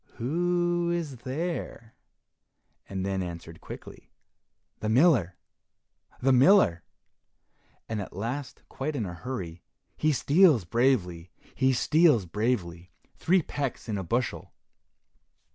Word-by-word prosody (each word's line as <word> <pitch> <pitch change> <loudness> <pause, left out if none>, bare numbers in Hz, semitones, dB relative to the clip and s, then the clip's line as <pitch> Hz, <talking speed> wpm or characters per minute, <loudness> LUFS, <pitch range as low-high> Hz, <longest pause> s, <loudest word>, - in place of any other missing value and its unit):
Who 175 +5 0
is 165 -6 -3
there?" 130 -3 -5 1.0
and 95 -1 -3
then 95 -1 -1
answered 85 -2 -8
quickly, - - -11 0.7
"The 110 - -2
miller! 115 - +3 0.8
the 135 +2 +2
miller!" 130 - +5 1.0
and 110 -2 -3
at 95 - -8
last 120 +8 -5
quite 145 +3 -4
in 115 -6 -2
a 90 - -6
hurry, 90 -4 -6 0.3
"He 155 - +1
steals 150 - +4
bravely! 90 -6 0 0.2
he 130 0 +2
steals 145 - +3
bravely! 90 -3 -2 0.2
three 180 0 +2
pecks 140 -4 -4
in 105 -3 -2
a - - -4
bushel." 120 +7 -2
125 Hz, 110 wpm, -27 LUFS, 95-155 Hz, 1.0 s, miller